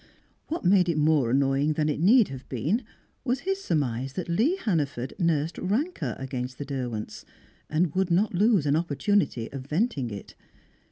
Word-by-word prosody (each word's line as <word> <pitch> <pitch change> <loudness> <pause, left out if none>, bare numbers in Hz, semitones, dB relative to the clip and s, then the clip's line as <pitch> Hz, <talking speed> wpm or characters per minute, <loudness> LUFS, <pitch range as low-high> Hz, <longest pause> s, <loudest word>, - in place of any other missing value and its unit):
What 325 - -4
made 180 -1 +4
it 165 - 0
more 150 -5 +3
annoying 135 +3 +2
than 150 0 0
it 150 - -1
need 215 +6 +5
have 135 -1 -9
been 155 - 0 0.4
was 250 0 -1
his 390 +1 -2
surmise 135 -4 -1
that 180 - -4
Lee 225 - +2
Hannaford 150 - -2
nursed 165 -2 0
rancour 195 - -1
against 125 -1 -5
the 145 - -5
Derwents, 125 -6 -4 0.5
and 155 0 +1
would 190 -1 +1
not 195 +5 +2
lose 200 -3 +3
an 145 0 +3
opportunity 160 - 0
of 135 -1 -7
venting 155 - 0
it. 100 -2 -8
155 Hz, 165 wpm, -26 LUFS, 135-195 Hz, 0.5 s, need